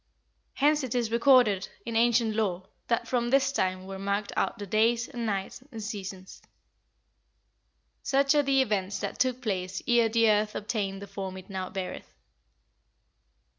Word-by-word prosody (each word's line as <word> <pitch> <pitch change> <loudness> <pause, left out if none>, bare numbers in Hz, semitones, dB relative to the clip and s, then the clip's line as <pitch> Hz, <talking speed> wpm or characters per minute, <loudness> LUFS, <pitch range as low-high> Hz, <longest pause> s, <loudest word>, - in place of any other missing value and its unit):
Hence 295 +1 +3
it 255 -2 -3
is 235 -2 0
recorded 235 -5 +4 0.2
in 230 -1 -4
ancient 230 -1 +3
lore 190 -5 -1 0.2
that 235 - 0
from 240 -2 0
this 275 +1 +3
time 185 -7 -1
were 195 0 -7
marked 200 +1 -2
out - - 0
the 205 - -6
days, 230 +4 +2
and 240 -4 -4
nights, 195 +2 -3
and 225 -3 -7
seasons." 195 -3 -7 1.6
"Such 275 +1 +2
are 295 - +4
the 275 -1 +3
events 200 -4 -1
that - - -4
took 255 -1 0
place 185 -4 -2
ere 235 -2 +4
the 230 0 +3
earth 210 0 +1
obtained 200 -2 -3
the - - -8
form 195 -1 -6
it 185 +2 -11
now 185 -1 -4
beareth." 190 -2 -6
220 Hz, 160 wpm, -28 LUFS, 195-240 Hz, 1.6 s, recorded